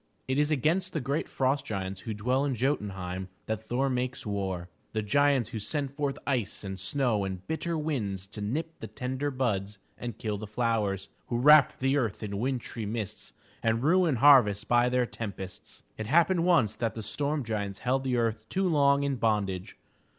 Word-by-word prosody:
It 130 +2 +1
is 150 0 +2
against 160 +6 +1
the 155 - 0
great 140 +3 -2
frost 135 +1 +1
giants 95 -5 -4
who 110 +4 -4
dwell 125 +6 +1
in 140 -3 0
Jo'tun 120 -5 0
heim 95 0 -5 0.2
that 110 -1 -2
Thor 125 +5 0
makes 125 -1 -2
war 95 -4 -2
— - - -40
the 110 -1 -1
giants 140 +2 +3
who 110 - -3
send 140 +5 -3
forth 140 -1 -2
ice 120 -9 -1
and 95 -1 -5
snow 115 +1 +1
and 95 -1 -5
bitter 165 +1 -2
winds 110 -12 -2
to 105 - -6
nip 155 +10 -3
the 110 - -6
tender 130 +6 -3
buds 105 -7 -1 0.2
and 120 -3 -5
kill 105 -2 -3
the 110 - -6
flowers; 105 -3 0 0.2
who 120 - -1
wrap 150 +2 +6
the 135 +2 +2
earth 115 -6 -1
in 100 -1 -3
wintry 120 -3 -2
mists 105 -1 -5 0.3
and 115 +1 +1
ruin 170 -1 +4
harvests 120 -6 +6
by 120 0 +3
their 125 0 +2
tempests. 100 -5 -7 0.2
It 110 - -3
happened 170 - +4
once 135 - +4
that 115 -1 -2
the 110 - -5
storm 145 +6 -1
giants 100 -3 -3
held 130 +2 +1
the 130 -2 0
earth 110 -2 -1
too 190 0 +1
long 140 -3 +4
in 140 -2 0
bondage. 100 -5 -1
120 Hz, 190 wpm, -29 LUFS, 105-140 Hz, 0.3 s, wrap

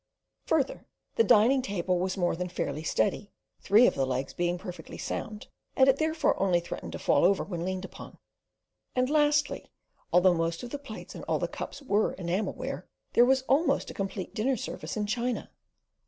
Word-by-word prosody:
Further, 285 -4 0 0.3
the 460 - +4
dining 250 - +5
table 185 -5 -1
was 185 +2 -1
more 175 -3 +1
than 180 +1 -4
"fairly" 165 -3 -3
steady, 200 +5 0 0.3
three 220 +5 +5
of - - +4
the 135 -1 0
legs 130 +1 -2
being 175 0 0
perfectly 180 -1 -8
sound, 215 -2 -5 0.3
and 265 - +5
it 270 0 +5
therefore 315 -5 +1
only 185 -3 +3
threatened 170 - -7
to - - -4
fall - - +2
over 190 +2 +4
when 175 -4 -5
leaned 185 +1 -3
upon. - - -11 0.8
And 255 +2 +1
lastly, 295 -1 +2 0.4
although 180 +1 +5
most 165 +2 -1
of 240 - -7
the 285 - -4
plates 225 -6 -9
and - - -8
all - - +1
the - - -1
cups - - -7
were 215 -4 +1
enamel 185 +3 -2
ware, 260 +1 -6 0.3
there 240 - +6
was 265 +1 +3
almost 280 +5 +1
a - - -9
complete 195 -1 -4
dinner 255 +4 0
service 215 - -5
in 210 - 0
china. 240 +3 -2
205 Hz, 185 wpm, -28 LUFS, 180-260 Hz, 0.8 s, there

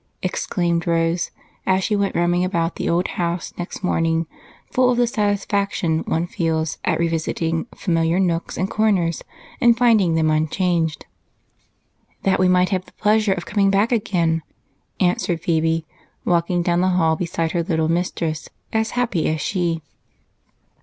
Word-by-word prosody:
exclaimed 175 -2 -1
Rose 165 0 +1 0.3
as 190 0 +2
she 210 - +1
went 200 -1 0
roaming 175 +1 +2
about 170 -2 -1
the - - -2
old 175 +2 +1
house 170 -1 -3
next 175 +3 -6
morning, 165 -2 +1 0.5
full 255 -1 +3
of 245 - +2
the 245 - +4
satisfaction 200 -6 0
one 165 +1 0
feels 160 -2 -1
at - - +1
revisiting 165 +1 -1
familiar 165 -1 +1
nooks 170 -3 -1
and 185 - 0
corners 195 -6 +1 0.4
and 235 -2 +5
finding 220 -8 +4
them 160 -1 +2
unchanged. 160 0 0 1.2
"That 190 -1 +2
we 185 - +4
might 180 0 +3
have 185 -2 -1
the - - -20
pleasure 210 -1 +2
of 175 -2 -6
coming 200 -2 +2
back 200 +4 +2
again," 170 -8 +1 0.6
answered 180 -1 +1
Phebe, 165 -1 +1 0.4
walking 175 0 +1
down 175 0 +1
the 185 - +2
hall 160 -2 +3
beside 165 -1 -2
her 175 - 0
little 160 -2 0
mistress, 165 -2 -2 0.2
as 220 0 +1
happy 225 -10 +1
as 155 0 -1
she. 170 -1 -1
175 Hz, 150 wpm, -21 LUFS, 165-195 Hz, 1.2 s, and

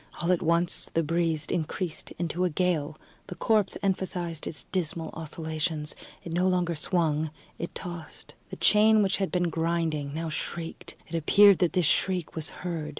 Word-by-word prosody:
All 175 +1 +1
at 180 - +2
once 170 0 +1
the 165 - +3
breeze 165 -1 0
increased 170 0 -3
into 170 +1 -1
a 180 - +3
gale. 155 -3 0 0.3
The 180 - -6
corpse 215 -1 +2
emphasized 180 -4 -1
its 160 - -6
dismal 165 -3 -2
oscillations. 155 -1 -3 0.3
It 165 - -6
no 180 +2 +2
longer 180 -2 +1
swung, 160 -1 +1 0.3
it 170 - -5
tossed; 170 -3 -8 0.2
the - - -6
chain, 215 0 +5
which 195 -1 +1
had 195 -2 -1
been 175 -2 +1
grinding, 160 -3 0
now 165 0 -2
shrieked. 165 +1 -5
It 165 - -14
appeared 200 +4 +6
that 180 0 +1
its 180 - +4
shriek 180 +1 +1
was 160 -1 -3
heard. 165 -4 -4
170 Hz, 165 wpm, -28 LUFS, 160-180 Hz, 0.3 s, appeared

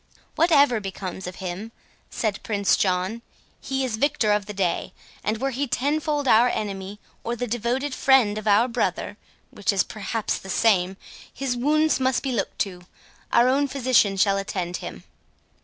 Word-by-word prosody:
"Whatever 285 -8 +4
becomes 190 -2 -6
of 180 - -6
him," 190 +5 -6 0.4
said 215 -4 -2
Prince 200 -3 +1
John, 185 +4 0 0.4
"he 270 0 -1
is 225 -4 -3
victor 280 -4 +1
of 205 -1 +1
the 210 - -5
day; 185 -3 -1 0.3
and 215 +1 0
were 270 +4 -1
he 275 +3 -2
tenfold 290 +2 0
our 240 +1 +6
enemy, 200 -2 -4 0.2
or 235 - -2
the 245 - -3
devoted 245 +4 -1
friend 255 -6 +3
of 215 - -8
our 210 +4 +5
brother, 235 - -2 0.4
which 205 - 0
is 195 -2 +2
perhaps 215 +1 -3
the 190 - -11
same, 190 -3 +2 0.3
his 270 -2 -2
wounds 305 +4 +2
must 260 -1 +1
be 270 - -1
looked 230 -5 -2
to—our 190 +5 -2
own 280 +2 +2
physician 255 -7 +2
shall 195 +1 +3
attend 185 -3 -3
him." - - -8
220 Hz, 160 wpm, -24 LUFS, 195-260 Hz, 0.4 s, our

